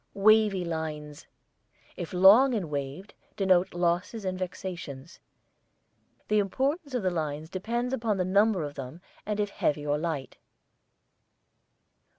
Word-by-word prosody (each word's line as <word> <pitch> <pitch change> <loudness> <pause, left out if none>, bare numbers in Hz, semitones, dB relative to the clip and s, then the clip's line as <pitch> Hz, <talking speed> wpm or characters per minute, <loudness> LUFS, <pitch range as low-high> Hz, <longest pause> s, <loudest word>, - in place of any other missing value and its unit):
WAVY 210 -2 +4
LINES, 155 -3 -5 0.7
if 170 - -6
long 210 +8 +6
and 180 -8 -3
waved, 145 +7 -5 0.2
denote 185 -3 +2
losses 180 +5 -1
and 185 0 -1
vexations. 175 -5 -6 1.1
The 215 0 +3
importance 270 - -1
of 240 - -1
the 185 - +1
lines 155 -1 -3
depends 235 +7 -2
upon 225 -5 0
the 185 - 0
number 200 -1 +3
of 145 -1 -5
them 135 +3 -8 0.3
and 210 0 -2
if 205 -1 -1
heavy 150 -5 -1
or 145 0 0
light. 155 -5 -4
185 Hz, 130 wpm, -28 LUFS, 155-210 Hz, 1.1 s, long